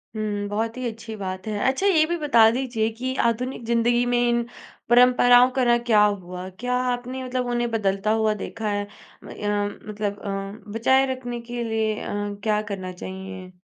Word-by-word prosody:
हुँ, 205 -1 -2
बहुत 225 +3 -2
ही 255 - -4
अच्छी 225 -1 -7
बात 185 -1 -5
है। 215 -1 -2
अच्छा 270 +9 -1
ये 330 -6 +5
भी - - +2
बता 260 -8 +5
दीजिए 240 -3 -1
कि 260 +1 -2 0.2
आधुनिक 245 +1 -4
ज़िंदगी 235 +1 +2
में 245 0 +1
इन 240 0 +2 0.5
परंपराओं 245 0 +6
का 260 - +3
ना 240 0 +5
क्या 235 -3 +3
हुआ? 185 -3 -3
क्या 245 +7 -3 0.2
आपने 250 +2 -5
मतलब 255 0 -2
उन्हें 240 0 0
बदलता 200 -1 0
हुआ 220 -1 +2
देखा 220 -2 -4
है? 205 0 -2 0.4
म - - -11
या 205 0 0
मतलब 205 0 -5
अ, 195 +1 -6
बचाए 260 +5 +3
रखने 245 -2 -6
के 240 0 -5
लिए 220 -1 0
अ, - - -5 0.3
क्या 210 -1 +1
करना 185 -2 -4
चाहिए? 190 0 -8
225 Hz, 180 wpm, -24 LUFS, 205-245 Hz, 0.5 s, परंपराओं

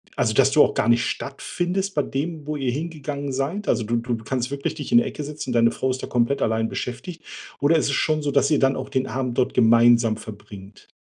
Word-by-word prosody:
also, - - +1
dass - - +4
du - - +5
auch - - +1
gar 115 - 0
nicht 120 0 +3
stattfindest 180 +7 -3
bei 145 - +3
dem, 150 +3 -4
wo 150 0 -3
ihr 130 -3 -1
hingegangen 145 -3 -4
seid? 150 +10 -3
Also, 115 - +2
du 120 +2 -1
du 120 0 -2
kannst 130 +2 -2
wirklich 140 0 -3
dich - - -7
in 235 - +6
die 235 - +6
Ecke 150 -7 -5
setzen 145 -2 -6
und - - -1
deine 115 0 +4
Frau 130 - -2
ist 130 - -5
da - - -4
komplett 120 +3 0
allein 110 0 +1
beschäftigt 130 +11 -6 0.4
oder 155 +3 +4
ist - - +1
es 140 - -1
schon 155 +1 +1
so, 145 -1 -1
dass 140 +1 +2
ihr 150 - +3
dann 135 0 +3
auch - - -5
den 130 0 -1
Abend 125 0 -3
dort 130 +1 +1
gemeinsam 115 -1 +4
verbringt? 105 -2 -12
135 Hz, 245 wpm, -23 LUFS, 120-150 Hz, 0.4 s, in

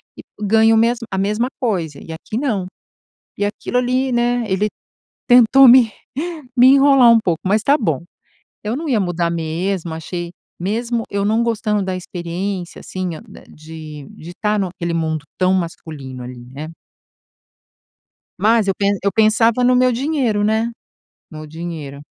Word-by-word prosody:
e - - -10 0.2
ganha 220 +2 +4
o - - +3
mesmo 230 +1 +1
a 190 - -2
mesma 210 +5 0
coisa 175 - -2
e 165 - -10
aqui 195 +7 -6
não". 220 -9 -1 0.7
E 205 - +1
aquilo 205 +4 -3
ali, 255 +1 0
né, 240 0 +1
ele 195 +1 0 0.6
tentou 250 +2 +7
me 240 -3 +6 0.6
me 245 - +7
enrolar 275 -2 +6
um 230 - +6
pouco, 170 -6 -1
mas 210 +3 +2
tá 280 +4 +4
bom. 165 - -1 0.6
Eu 210 +2 -2
não 320 +1 -5
ia 235 -5 +2
mudar 175 -2 -1
mesmo, 170 +1 -3
achei 170 +1 -6 0.3
mesmo 230 +5 -2
eu 200 0 -1
não 220 +3 +2
gostando 215 -3 0
da 190 0 -3
experiência, 180 +1 -5
assim, 185 -1 -5 0.2
da - - -14
de 155 -2 -10 0.3
tá 210 0 +1
naquele 175 -3 -3
mundo 160 -2 -2
tão 185 0 +2
masculino 155 -7 -5
ali, 125 -1 -9
né? 150 +3 -7 1.7
Mas 220 0 +3
eu 195 - +2
pe 200 - -1 0.2
eu 200 - +1
pensava 225 +2 +3
no 250 0 +4
meu 255 0 +3
dinheiro, 250 -5 0
né? 220 +2 +1 0.6
No 155 0 -9
dinheiro. 155 -3 -7
205 Hz, 155 wpm, -19 LUFS, 170-235 Hz, 1.7 s, tentou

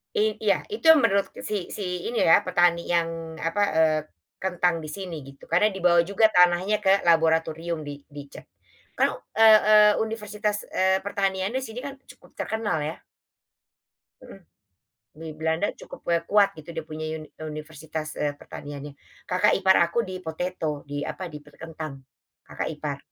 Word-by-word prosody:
I 215 0 +1
iya 200 -3 +2
itu 430 -4 -6
yang 320 -2 +8
menurut 200 -3 +3 0.2
si 205 -4 -3
si 180 -3 -4
ini 235 -1 0
ya 165 - +7
petani 175 -2 +2
yang 165 -1 -1
apa, 185 +5 -1
eee, 160 -1 +4 0.4
kentang 180 -2 0
di - - -6
sini 180 +2 -6
gitu 140 0 -15
karena 180 +5 +4
dibawa 175 -2 +3
juga 200 +4 +3
tanahnya 180 +3 +4
ke 195 -1 +3
laboratorium 165 0 +1
di 145 -1 -7
di 145 0 -9
cek - - -12 0.5
ke - - +2 0.3
e 225 - +6 0.3
e - - +7 0.3
universitas, 210 -1 -2 0.2
eee, 190 0 +2
pertaniannya 195 +2 -1
di 260 - -6
sini 225 +2 -7
kan 280 - -5
cukup - - -17
terkenal 220 -6 -1
ya. 155 +2 -4 1.2
Mhm, - - -13 0.8
di 165 - -6
Belanda 160 +5 0
cukup, - - -11
eee, 170 -1 +2
kuat 205 -1 +5
gitu 155 +1 -12
dia 165 - -4
punya 155 0 -5
uni 155 -1 -11 0.2
universitas, 155 0 -6
eee, 145 -1 -1
pertaniannya, 145 0 -8 0.4
kakak 180 0 +3
ipar 190 -1 +4
aku 235 - +1
di 185 - -5
potato 160 -2 -3
di 145 0 -3
apa - - -6
di 150 - -8
perkentang 155 -2 -9 0.5
kakak - - -4
ipar, - - -4
175 Hz, 160 wpm, -25 LUFS, 160-200 Hz, 1.2 s, yang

